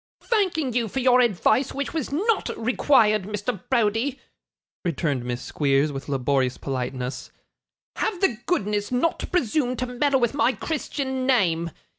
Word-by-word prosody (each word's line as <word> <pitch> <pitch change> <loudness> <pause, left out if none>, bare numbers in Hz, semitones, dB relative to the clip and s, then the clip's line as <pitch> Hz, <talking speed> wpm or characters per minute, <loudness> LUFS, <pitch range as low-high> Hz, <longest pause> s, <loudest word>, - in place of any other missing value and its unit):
'Thanking 355 - 0
you 235 -1 +1
for 265 - -3
your 250 -1 +5
advice 240 +3 +2
which 280 0 -3
was 315 -6 -3
not 410 +8 +1
required, 225 -3 +3
Mr. 210 0 -3
Browdie,' 240 +3 +1 0.6
returned 155 -7 -1
Miss 125 0 -4
Squeers, 140 0 +1
with 135 0 -7
laborious 135 -1 0
politeness, 130 -1 -4 0.7
'have 375 - -1
the 245 - +1
goodness 210 - 0
not 255 +7 +1
to - - -4
presume 255 -5 0
to 255 - -2
meddle 265 +2 +1
with 240 0 +1
my 265 -3 +2
Christian 265 -4 -3
name. 170 -10 +2
240 Hz, 145 wpm, -24 LUFS, 165-275 Hz, 0.7 s, your